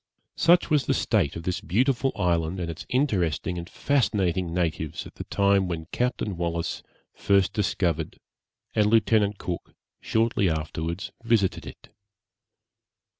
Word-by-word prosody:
Such 175 -1 +4
was 150 -3 +2
the - - +2
state 70 - +1
of 85 - -6
this 90 +1 -2
beautiful 130 - +1
island 85 0 0
and 85 -2 -2
its 80 - -9
interesting 90 - 0
and 85 +1 -8
fascinating 95 -10 0
natives 80 -2 -2
at - - -11
the - - -8
time 100 -1 +2
when 85 -2 -4
Captain 120 -6 -1
Wallis 85 -1 -2 0.3
first 100 -2 +2
discovered 90 -6 -1 0.6
and 105 -1 +3
Lieutenant 105 -2 +3
Cook 90 -2 -6 0.2
shortly 110 -4 +1
afterwards 80 +2 -3
visited 115 -5 +1
it. - - -12
95 Hz, 130 wpm, -26 LUFS, 85-110 Hz, 0.6 s, Such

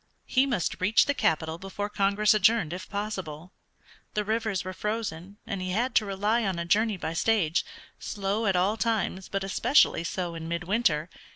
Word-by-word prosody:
He 265 +1 +2
must 220 -11 -1
reach 205 +4 +4
the 285 - +1
capital 160 - 0
before 195 +2 -4
Congress 205 +1 +2
adjourned 210 -5 +3
if 185 +3 -7
possible. 190 -5 -5 0.6
The 210 - +1
rivers 220 -3 -1
were 185 - -4
frozen, 200 -3 -4
and 200 -5 -4
he 185 0 -3
had 240 +6 0
to 215 - +3
rely 205 +4 +1
on 190 -4 -1
a 170 - -3
journey 210 +3 +2
by 165 -2 -4
stage, 175 -3 +2 0.4
slow 205 +2 -2
at 195 - +2
all 190 +5 +2
times, 215 -5 -1
but 195 0 -2
especially 195 - +3
so 175 0 -3
in 165 -1 -6
midwinter. 170 -1 0
195 Hz, 175 wpm, -27 LUFS, 180-215 Hz, 0.6 s, reach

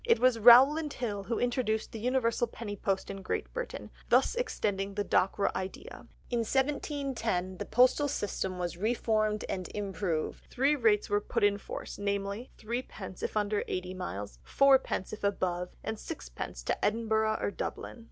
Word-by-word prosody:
It 465 -1 +3
was 255 -2 +4
Rowland 270 +7 +7
Hill 205 -5 -3
who 230 - -1
introduced 240 -3 0
the 225 - -6
universal 240 0 +1
penny 220 -2 -6
post 195 -1 -1
in 195 - -7
Great 185 - -3
Britain, - - -5 0.2
thus - - +4
extending 200 - -2
the 205 - 0
Dockwra 195 +2 +2
idea. 190 0 -6 0.2
In 240 - +1
1710 265 - -1
the - - -3
postal 255 +5 +4
system 195 -7 -2
was 175 -1 -3
reformed 215 0 0
and 185 -2 -4
improved, 195 -5 -2
three 275 +4 +2
rates 220 -6 +3
were 205 0 +1
put 230 +1 -2
in 205 0 +3
force, - - -7
namely: 200 +3 -2
threepence 215 -5 -6
if - - -2
under 210 0 +1
eighty 185 0 -3
miles; 105 - -6
fourpence 270 - +3
if 215 - -8
above; 180 -3 0
and 220 0 -4
sixpence - - -7
to - - -2
Edinburgh 220 0 +1
or - - -1
Dublin. 235 - -5
215 Hz, 160 wpm, -30 LUFS, 195-245 Hz, 0.2 s, Rowland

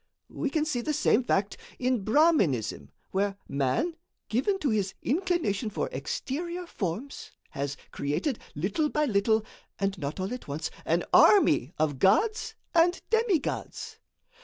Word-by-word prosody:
We 290 - -2
can 305 +1 0
see 280 -6 -1
the 305 +4 -1
same 250 - +3
fact 200 -4 0 0.2
in 250 -4 0
Brahminism, 215 - +2 0.2
where 195 +1 0
man, 140 - 0 0.3
given 270 - +1
to 290 -9 0
his 200 -3 0
inclination 300 - 0
for 210 - -2
exterior 345 - -4
forms, 220 - -5 0.2
has 140 0 -3
created, 150 - -1 0.2
little 200 - 0
by 300 +1 +1
little, 220 -2 +2 0.3
and 195 0 0
not 145 +3 -4
all 190 +5 -2
at 250 - -7
once, 145 +3 -3
an - - +1
army 155 - +6
of 150 -4 0
gods 440 - +2 0.2
and 345 +1 +4
demigods. 450 - -1
240 Hz, 135 wpm, -28 LUFS, -, 0.3 s, army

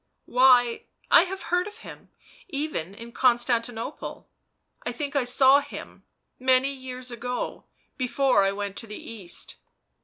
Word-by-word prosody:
" - - -50
Why, 250 -1 +4 0.3
I 340 - +8
have 380 +1 -6
heard 360 +2 +2
of 420 +1 -10
him - - -11 0.2
— - - -24
even 275 - -3
in 230 +2 -10
Constanti 240 -1 +2
nople. 230 +6 -7 0.6
I - - -2
think 290 -2 -4
I 275 -3 +2
saw 265 +2 +6
him 285 - -10 0.2
— - - -50
many 260 +1 +3
years 255 -1 -8
ago, 245 +1 -4 0.3
before 255 -3 +2
I 195 - +2
went 200 0 -4
to 230 - -5
the 210 - -7
East." 200 -6 -7
250 Hz, 160 wpm, -26 LUFS, 230-275 Hz, 0.6 s, I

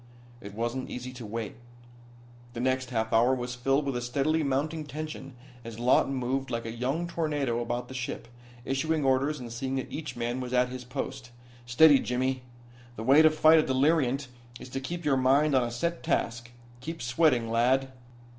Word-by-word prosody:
It 100 -1 -9
wasn't 120 +3 -3
easy 125 +1 -6
to 120 -3 -8
wait. 115 +1 -5 1.0
The 120 - -6
next 130 0 0
half 110 -3 -2
hour 120 +3 +4
was 125 0 -4
filled 135 +4 +1
with 135 -2 -2
a 120 - -2
steadily 140 +6 0
mounting 150 +3 -1
tension 150 -3 -7 0.3
as 115 -1 -8
Lawton 125 +3 +3
moved 130 +1 -2
like 115 0 -3
a 115 - -4
young 130 +9 -2
tornado 150 -8 -1
about 120 +1 -3
the 130 - -9
ship, 120 -2 -5 0.4
issuing 150 +2 0
orders 135 +3 +1
and 120 -2 -7
seeing 130 +2 -3
that 130 - -4
each 150 -5 -5
man 120 +1 -2
was 125 -1 -5
at 125 0 +3
his 125 0 -7
post. 130 0 -5 0.4
"Steady, 145 +3 +6
Jimmy. 130 +1 -1 0.5
The 110 - -6
way 135 +6 +6
to 160 - +7
fight 155 +1 +5
a - - +3
deliriant 140 -1 +2 0.3
is - - -10
to 135 - -3
keep 170 +5 -6
your 140 -2 +3
mind 140 +3 +3
on 130 - +4
a 120 - -2
set 170 +9 -2
task. 120 +1 -1 0.3
Keep 160 +3 -6
sweating, 125 -3 +2
lad." 130 +3 +2
130 Hz, 185 wpm, -28 LUFS, 120-145 Hz, 1.0 s, to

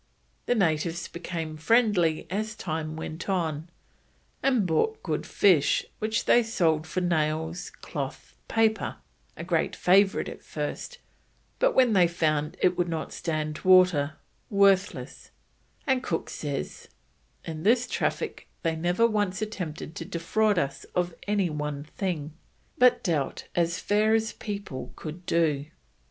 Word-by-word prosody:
The 245 - +3
natives 165 -4 0
became 165 -2 -5
friendly 180 -3 +3
as 215 +2 -2
time 155 -4 -4
went 160 +3 -6
on, 165 -4 -1 0.7
and 255 -6 +2
brought 305 - 0
good - - -2
fish 175 -8 +3
which 220 +1 -1
they 240 - +6
sold 165 -9 +1
for 185 +4 -2
nails, 160 0 -1
cloth, - - -6
paper 220 -1 +1 0.4
(a - - -5
great - - 0
favourite 195 +2 +3
at - - -8
first, - - -5 0.6
but - - +3
when 250 -4 +5
they 180 -3 +5
found 155 -1 0
it 180 0 +4
would 175 -1 +1
not 160 -1 -4
stand 155 -2 -3
water, 180 -6 +5 0.4
worthless), 200 -1 +2 0.6
and 265 -1 +2
Cook 165 -9 -3
says: 145 -2 -5 0.6
"In 160 -1 -5
this 235 +6 +3
Traffic - - -2 0.2
they 165 -2 +1
never 175 +7 +2
once 205 -4 0
attempted 180 -8 -5
to - - -4
defraud 200 +4 +1
us 140 -3 -1
of 180 -1 0
any 200 -4 +1
one 150 -1 -3
thing, 155 -2 -4 0.4
but 250 0 +4
dealt 155 -7 -1
as 170 0 +1
fair 215 +2 +2
as 225 0 0
people 200 - -6
could 170 +3 -8
do." 150 -4 +1
175 Hz, 135 wpm, -27 LUFS, 155-205 Hz, 0.7 s, they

